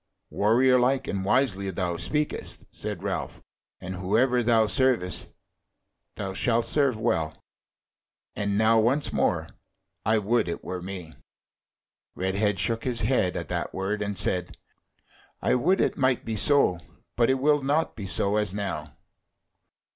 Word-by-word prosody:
"Warrior 125 Hz, +5 st, +4 dB
like 130 Hz, +2 st, +1 dB
and 95 Hz, -1 st, -2 dB
wisely 100 Hz, -3 st, +1 dB
thou 90 Hz, -1 st, -2 dB
speakest," 150 Hz, -, -3 dB
said -, -, -5 dB
Ralph; -, -, -4 dB, 0.4 s
"and 95 Hz, +1 st, -6 dB
whoever 110 Hz, +7 st, +2 dB
thou 115 Hz, -1 st, +4 dB
servest 125 Hz, -6 st, +1 dB, 0.8 s
thou 95 Hz, -2 st, -4 dB
shalt 115 Hz, +3 st, +1 dB
serve 135 Hz, -7 st, +1 dB
well. 80 Hz, -9 st, -1 dB, 0.9 s
And 100 Hz, -1 st, -1 dB
now 110 Hz, +1 st, +4 dB
once 130 Hz, +7 st, +2 dB
more -, -, 0 dB, 0.5 s
I 110 Hz, +1 st, +2 dB
would 110 Hz, +1 st, +1 dB
it 85 Hz, -, -4 dB
were 90 Hz, -1 st, -5 dB
me." 90 Hz, -3 st, -7 dB, 1.0 s
Redhead 95 Hz, +2 st, 0 dB
shook 115 Hz, +4 st, -1 dB
his 125 Hz, -3 st, -2 dB
head 110 Hz, -5 st, +1 dB
at -, -, -5 dB
that -, -, -3 dB
word, 100 Hz, +3 st, -2 dB
and 100 Hz, -1 st, -3 dB
said: 90 Hz, -2 st, 0 dB, 0.8 s
"I -, -, +1 dB
would 175 Hz, +10 st, +2 dB
it -, -, +1 dB
might 130 Hz, -3 st, +1 dB
be 110 Hz, -, -2 dB
so; 110 Hz, -6 st, +3 dB, 0.4 s
but 120 Hz, 0 st, +3 dB
it 130 Hz, -, +4 dB
will 145 Hz, +2 st, +2 dB
not 145 Hz, +4 st, 0 dB
be 100 Hz, -3 st, -6 dB
so 100 Hz, +2 st, +2 dB
as 105 Hz, -3 st, -1 dB
now." 75 Hz, -8 st, -4 dB
110 Hz, 145 wpm, -26 LUFS, 95-125 Hz, 1.0 s, Warrior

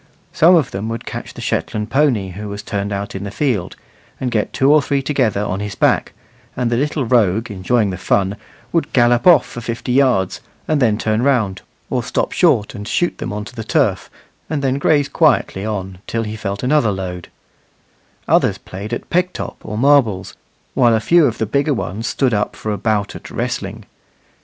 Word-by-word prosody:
Some 175 Hz, +3 st, +6 dB
of 155 Hz, -6 st, +2 dB
them 100 Hz, +3 st, -4 dB
would 115 Hz, 0 st, -5 dB
catch -, -, -7 dB
the -, -, -8 dB
Shetland 105 Hz, +1 st, -2 dB
pony 130 Hz, -9 st, +2 dB
who 105 Hz, +3 st, -7 dB
was 100 Hz, +1 st, -6 dB
turned 100 Hz, 0 st, -3 dB
out 100 Hz, 0 st, -4 dB
in 95 Hz, -, -5 dB
the 100 Hz, -, -4 dB
field, 110 Hz, -6 st, -1 dB, 0.4 s
and 125 Hz, -2 st, -2 dB
get 110 Hz, -2 st, 0 dB
two 135 Hz, +2 st, +3 dB
or 155 Hz, -, +6 dB
three 140 Hz, -1 st, -1 dB
together 125 Hz, -8 st, +1 dB
on 95 Hz, -2 st, -2 dB
his 105 Hz, -1 st, -4 dB
back, -, -, +2 dB, 0.4 s
and 125 Hz, -2 st, 0 dB
the -, -, +2 dB
little 145 Hz, +1 st, 0 dB
rogue, 110 Hz, -2 st, +2 dB
enjoying 100 Hz, +2 st, +1 dB
the 90 Hz, -, -5 dB
fun, 100 Hz, +1 st, +1 dB, 0.4 s
would 165 Hz, -, 0 dB
gallop 120 Hz, +3 st, +3 dB
off 175 Hz, -4 st, +7 dB
for 120 Hz, -, -8 dB
fifty 115 Hz, +2 st, -4 dB
yards, 125 Hz, -8 st, +2 dB, 0.3 s
and 155 Hz, -2 st, +1 dB
then 110 Hz, -4 st, +3 dB
turn 110 Hz, 0 st, 0 dB
round, 115 Hz, -8 st, +1 dB, 0.3 s
or -, -, +1 dB
stop -, -, -1 dB
short 105 Hz, -, +2 dB
and 105 Hz, 0 st, -7 dB
shoot 175 Hz, -, 0 dB
them -, -, -4 dB
on 105 Hz, 0 st, -4 dB
to -, -, -11 dB
the 110 Hz, -, -5 dB
turf, -, -, 0 dB, 0.4 s
and 145 Hz, -2 st, -2 dB
then 135 Hz, 0 st, +1 dB
graze 145 Hz, -1 st, +3 dB
quietly 145 Hz, -, +2 dB
on 95 Hz, -3 st, -4 dB
till 115 Hz, 0 st, -1 dB
he 110 Hz, 0 st, -5 dB
felt 100 Hz, -1 st, -4 dB
another 125 Hz, -4 st, +3 dB
load; 90 Hz, -3 st, -5 dB, 1.0 s
others -, -, +3 dB
played 100 Hz, +5 st, -8 dB
at -, -, -4 dB
peg 180 Hz, +1 st, +2 dB
top -, -, -6 dB
or 105 Hz, 0 st, -5 dB
marbles, 115 Hz, -8 st, +3 dB, 0.4 s
while 120 Hz, -3 st, +4 dB
a -, -, +2 dB
few 170 Hz, +5 st, +4 dB
of 115 Hz, -, -3 dB
the 110 Hz, -, 0 dB
bigger 140 Hz, +6 st, +1 dB
ones 110 Hz, +1 st, -4 dB
stood 130 Hz, -4 st, +1 dB
up 105 Hz, -1 st, -1 dB
for 110 Hz, -, -4 dB
a 105 Hz, -, -2 dB
bout 105 Hz, -3 st, 0 dB
at -, -, -9 dB
wrestling. -, -, -4 dB
115 Hz, 200 wpm, -18 LUFS, 100-135 Hz, 1.0 s, off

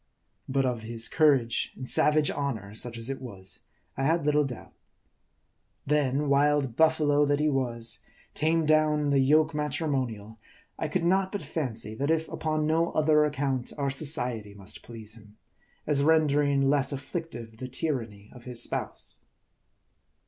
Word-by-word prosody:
But 135 Hz, 0 st, +1 dB
of 125 Hz, -3 st, -1 dB
his 115 Hz, +1 st, -1 dB
courage, 140 Hz, -7 st, +2 dB
and 130 Hz, -, -7 dB
savage 150 Hz, +2 st, +3 dB
118 -, -, -7 dB, 0.2 s
MARDI. 110 Hz, -3 st, -8 dB
honor, 100 Hz, -, -12 dB
such 120 Hz, +1 st, -1 dB
as 115 Hz, 0 st, -4 dB
it 135 Hz, -, -6 dB
was, 95 Hz, -7 st, -9 dB, 0.4 s
I 135 Hz, -, -2 dB
had 160 Hz, +2 st, +1 dB
little 150 Hz, 0 st, +3 dB
doubt. 125 Hz, -4 st, -7 dB, 1.1 s
Then, 145 Hz, 0 st, +1 dB
wild 140 Hz, -3 st, +2 dB
buffalo 150 Hz, -2 st, +3 dB
that 145 Hz, 0 st, +1 dB
he 150 Hz, 0 st, +2 dB
was, 120 Hz, -4 st, -2 dB, 0.3 s
tamed 160 Hz, 0 st, +1 dB
down 155 Hz, -1 st, +3 dB
in 145 Hz, -1 st, 0 dB
the 140 Hz, -, +4 dB
yoke 155 Hz, +4 st, +4 dB
matrimonial, 135 Hz, -8 st, -2 dB, 0.4 s
I 160 Hz, -, -1 dB
could 165 Hz, +3 st, -1 dB
not 190 Hz, +2 st, +2 dB
but 205 Hz, -5 st, -4 dB
fancy, 125 Hz, -8 st, -2 dB
that 140 Hz, +6 st, -2 dB
if 160 Hz, 0 st, +1 dB
upon 155 Hz, -1 st, -1 dB
no 165 Hz, +2 st, +1 dB
other 150 Hz, -1 st, +4 dB
account, 135 Hz, -4 st, -2 dB
our 140 Hz, -2 st, 0 dB
society 125 Hz, -8 st, -1 dB
must 100 Hz, 0 st, -9 dB
please 110 Hz, -2 st, -8 dB
him, 105 Hz, -2 st, -16 dB, 0.5 s
as 145 Hz, -2 st, +2 dB
rendering 145 Hz, -2 st, +3 dB
less 140 Hz, -1 st, +2 dB
afflictive 135 Hz, -5 st, -6 dB
the 130 Hz, -, -6 dB
tyranny 120 Hz, -7 st, -4 dB
of 125 Hz, -2 st, -14 dB
his 120 Hz, -2 st, -1 dB
spouse. -, -, -4 dB
140 Hz, 160 wpm, -28 LUFS, 120-150 Hz, 1.1 s, the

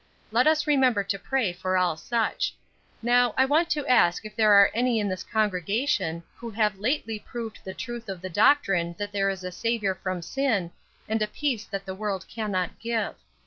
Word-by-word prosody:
Let 245 Hz, +5 st, +3 dB
us 310 Hz, -1 st, +3 dB
remember 260 Hz, -8 st, +3 dB
to 195 Hz, 0 st, -3 dB
pray 240 Hz, -4 st, 0 dB
for 185 Hz, +1 st, -1 dB
all 180 Hz, -3 st, +2 dB
such. 225 Hz, +7 st, -1 dB, 0.5 s
Now, 245 Hz, 0 st, +3 dB
I 265 Hz, -, +5 dB
want 315 Hz, +5 st, +2 dB
to 295 Hz, -2 st, -1 dB
ask 215 Hz, -6 st, +3 dB
if 210 Hz, 0 st, -9 dB
there 215 Hz, -1 st, +4 dB
are 200 Hz, 0 st, +7 dB
any 240 Hz, 0 st, +1 dB
in 205 Hz, -, 0 dB
this 185 Hz, -1 st, -3 dB
congregation 200 Hz, -, 0 dB
who 235 Hz, -, -7 dB
have 210 Hz, -2 st, 0 dB
lately 225 Hz, -1 st, -1 dB
proved 230 Hz, 0 st, -7 dB
the 190 Hz, -, -7 dB
truth 240 Hz, -2 st, -6 dB
of 190 Hz, -2 st, -5 dB
the 185 Hz, -, -6 dB
doctrine 190 Hz, -, +3 dB
that 205 Hz, 0 st, -4 dB
there 195 Hz, -1 st, +1 dB
is 190 Hz, -1 st, -4 dB
a 180 Hz, -, -4 dB
Saviour 220 Hz, -1 st, 0 dB
from 185 Hz, -2 st, -4 dB
sin, 210 Hz, -5 st, 0 dB, 0.4 s
and 220 Hz, 0 st, 0 dB
a 215 Hz, -, +2 dB
peace 240 Hz, -1 st, -2 dB
that 195 Hz, -1 st, -5 dB
the 190 Hz, -, -5 dB
world 195 Hz, -2 st, -3 dB
cannot 200 Hz, -5 st, -3 dB
give. 230 Hz, -2 st, -1 dB
215 Hz, 195 wpm, -26 LUFS, 190-240 Hz, 0.5 s, are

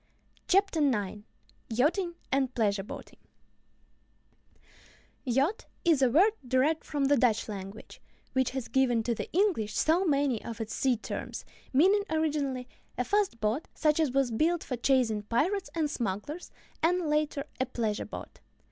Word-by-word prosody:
] -, -, -35 dB
CHAPTER 390 Hz, -3 st, +3 dB
IX 210 Hz, -8 st, 0 dB, 0.5 s
YACHTING 335 Hz, -, +1 dB, 0.2 s
AND 265 Hz, -2 st, +1 dB
PLEASURE 205 Hz, -4 st, +1 dB
BOATING 195 Hz, -, -10 dB, 2.0 s
Yacht 275 Hz, -, 0 dB, 0.2 s
is 320 Hz, -5 st, +4 dB
a 260 Hz, -, +5 dB
word 365 Hz, -, +5 dB
derived 260 Hz, +5 st, +1 dB
from 290 Hz, -2 st, -1 dB
the 285 Hz, +1 st, +4 dB
Dutch 230 Hz, -3 st, +2 dB
language, 200 Hz, 0 st, -8 dB, 0.3 s
which 260 Hz, -1 st, +2 dB
has 260 Hz, -2 st, -4 dB
given 245 Hz, -3 st, +2 dB
to 235 Hz, -, 0 dB
the -, -, -6 dB
English 335 Hz, -, +1 dB
so 330 Hz, +4 st, +3 dB
many 280 Hz, -, +1 dB
of 230 Hz, -, -6 dB
its 225 Hz, -1 st, -4 dB
sea 260 Hz, -3 st, +1 dB
terms, 220 Hz, -, -6 dB, 0.3 s
meaning, 375 Hz, +10 st, +5 dB
originally, 290 Hz, -5 st, -1 dB, 0.3 s
a 250 Hz, -, +1 dB
fast 395 Hz, -, 0 dB
boat, 220 Hz, +9 st, -1 dB
such 305 Hz, 0 st, +2 dB
as 315 Hz, -3 st, +3 dB
was 270 Hz, -2 st, +1 dB
built 325 Hz, +9 st, +1 dB
for 255 Hz, -, -3 dB
chasing 240 Hz, -4 st, +2 dB
pirates 305 Hz, -, 0 dB
and 320 Hz, -2 st, +1 dB
smugglers, 245 Hz, -, -4 dB, 0.3 s
and, 345 Hz, +1 st, +2 dB
later, 300 Hz, -2 st, 0 dB
a 260 Hz, -, +1 dB
pleasure 220 Hz, -4 st, -2 dB
boat. -, -, -9 dB
270 Hz, 150 wpm, -29 LUFS, 230-315 Hz, 2.0 s, a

